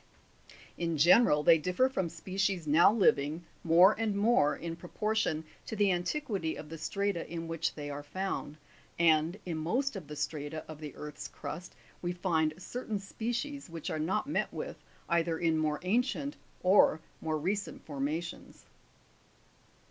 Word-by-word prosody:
In 170 -2 0
general, 155 0 +6
they 165 +2 +7
differ 180 +11 +2
from 190 -10 -1
species 185 +1 -1
now 155 +6 +6
living, 165 -7 +2 0.2
more 175 +5 +7
and 220 -3 0
more, 200 -8 +3
in 165 -1 -5
proportion 175 -1 -1 0.2
to 220 - -4
the 205 -2 +3
antiquity 185 - -1
of 150 - -9
the 165 - -6
strata 200 -4 -2
in 165 -1 -4
which 165 -1 -2
they 145 -1 -5
are 145 +1 -5
found, 170 -1 -4 0.4
and, 165 +1 +3
in 170 -3 -3
most 250 - 0
of 180 -7 -7
the 150 - -7
strata 150 +1 -4
of 155 -1 -9
the 150 -3 -7
earth's 150 -1 -7
crust 180 +4 -7 0.3
we 175 0 -1
find 160 -4 +1
certain 215 +3 -4
species 240 +7 -4
which 165 -2 -5
are 155 - -2
not 190 +9 0
met 290 - -1
with - - -5 0.3
either 170 -1 +1
in 165 -1 +2
more 150 -1 0
ancient 250 +8 0 0.3
or 185 -3 +5 0.2
more 155 -1 -1
recent 195 +6 -3
formations. 155 +4 -4
170 Hz, 155 wpm, -31 LUFS, 155-200 Hz, 0.4 s, they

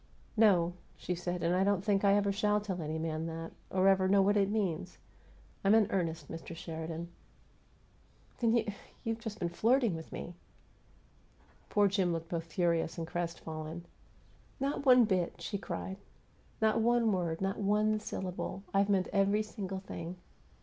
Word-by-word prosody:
"No," 185 -6 +4 0.2
she 180 - -3
said. 175 0 -3
"And 170 +2 +2
I 185 - +3
don't 200 -1 +1
think 200 -2 +2
I 200 0 +5
ever 200 -1 +2
shall 210 +1 +2
tell 190 -4 -4
any 155 0 -3
man 160 0 -2
that 165 0 -5 0.2
or 190 0 +2
ever 190 -1 +5
know 195 0 +5
what 205 +2 +3
it 200 -1 +3
means. 185 -5 -2 0.7
I'm 200 +2 +5
in 220 -2 +6
earnest, 165 -5 -1
Mr. 165 0 -7
Sheridan." 165 +1 -5 1.3
"Then 230 -1 +3
you 235 - +2 0.4
you've 225 0 -2
just 220 -2 -6
been 175 -4 -1
flirting 230 +4 +2
with 160 0 -8
me!" 175 - -6 1.4
Poor 205 -1 +4
Jim 190 -3 +1
looked 165 0 -4
both 165 -2 -2
furious 170 -1 +1
and 165 - -3
crestfallen. 165 -1 -5 0.7
"Not 280 +1 -1
one 250 -2 +8
bit!" 185 -4 0
she 200 - -3
cried. 190 0 -5 0.6
"Not 220 +1 +3
one 235 -1 +3
word! 170 -4 -1
Not 195 0 -1
one 210 +1 +2
syllable! 190 -1 -4
I've 200 +1 +3
meant 190 -2 +2
every 200 +1 +3
single 195 -3 -5
thing!" 175 -2 -6
190 Hz, 165 wpm, -32 LUFS, 170-210 Hz, 1.4 s, one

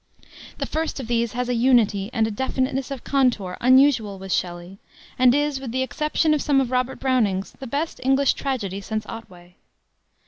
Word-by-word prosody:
The - - -2
first 320 -2 -3
of 265 - -5
these 235 0 -1
has 250 0 -2
a 250 - 0
unity, 230 -5 +2
and 225 -2 +1
a 220 - -2
definiteness 260 +3 -2
of 275 -3 -6
contour 245 -10 +1
unusual 255 -5 +4
with 190 0 -8
Shelley, 175 +2 -3 0.4
and 255 0 +5
is, 290 -1 0
with 265 -4 -6
the 260 +2 0
exception 305 +3 0
of 300 - 0
some 285 -2 +2
of 260 -2 -1
Robert 255 0 -1
Browning's, 220 -8 0
the 265 - -7
best 290 +7 -3
English 270 +1 +3
tragedy 205 -8 -3
since 215 +1 -4
Otway. 180 -6 -11
250 Hz, 180 wpm, -23 LUFS, 210-270 Hz, 0.4 s, and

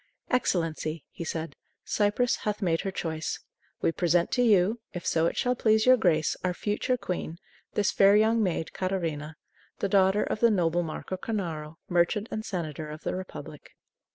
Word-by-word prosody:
"Excellency," 165 - 0
he - - -6
said, 160 -2 -4 0.3
"Cyprus 210 +4 +1
hath 210 0 -2
made 165 -3 +1
her 195 - -2
choice. 160 -4 -3 0.4
We - - +3
present 170 0 +1
to 250 - +2
you, 215 -1 +4
if 175 -2 -6
so 165 0 +2
it - - -3
shall 250 -1 +2
please 220 -3 +3
your 255 0 +8
grace, 165 -9 +2
our 180 -1 0
future 210 +6 -1
queen, 175 -6 -4 0.4
this 210 -1 +2
fair 195 +1 +6
young 220 +2 +4
maid, 175 -5 -1
Catarina, 165 -5 -2 0.4
the - - -1
daughter 195 +1 +4
of - - -2
the 235 - +5
noble 175 -4 +2
Marco 170 +3 -5
Cornaro, 165 -7 -4
merchant 175 +5 +1
and 215 - -3
senator 155 -6 -4
of 155 +1 -8
the - - -2
Republic." 185 0 -8
185 Hz, 170 wpm, -28 LUFS, 165-210 Hz, 0.4 s, your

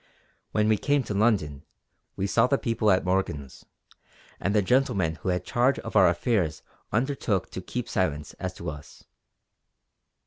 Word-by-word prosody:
When 105 0 +2
we 110 -2 +3
came 145 -1 +2
to 105 - -4
London 100 -10 +1 0.5
we 95 - -2
saw 100 - +3
the 140 - +2
people 115 -5 0
at 95 -2 +3
Morgan's; 90 -8 -2 0.7
and 100 +2 -1
the 105 - +4
gentleman 95 -8 +1
who - - -4
had 90 0 -1
charge 125 +3 +2
of 115 - -7
our 95 -4 +7
affairs 90 - 0 0.3
undertook 115 -6 0
to 95 - -5
keep 125 +6 -4
silence 75 -6 -1
as - - -4
to - - -5
us. 75 -2 -12
100 Hz, 160 wpm, -26 LUFS, 85-115 Hz, 0.7 s, our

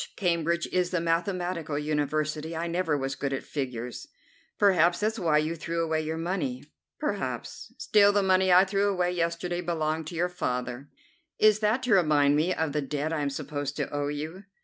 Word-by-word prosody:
Cambridge 170 -2 0
is 180 -1 +1
the 180 - 0
mathematical 170 -2 -1
university. 155 +1 -1
I 165 - -2
never 170 -3 0
was 135 0 -2
good 135 0 -3
at 135 - -3
figures." 125 -4 -5 0.5
"Perhaps 175 -4 +4
that's 220 +2 0
why 160 -4 +3
you 155 +2 0
threw 170 +1 -2
away 160 -1 0
your 160 +1 -3
money." 195 +10 -2 0.4
"Perhaps. - - -4
Still, 205 -1 +4
the 205 -1 +2
money 190 0 +3
I 180 +2 +7
threw 200 +1 +1
away 180 -2 0
yesterday 175 0 -1
belonged 160 -2 -2
to 170 - -7
your 175 +2 +1
father." 125 -5 -4 0.5
"Is 215 -1 +5
that 220 +4 +1
to 250 -3 +2
remind 150 -6 +4
me 160 +5 +2
of 160 -4 -1
the 150 +1 -1
debt 145 +3 -2
I 155 - -1
am 145 - 0
supposed 145 0 -4
to 145 - -2
owe 145 0 -1
you?" 155 +7 -5
165 Hz, 185 wpm, -27 LUFS, 150-180 Hz, 0.5 s, I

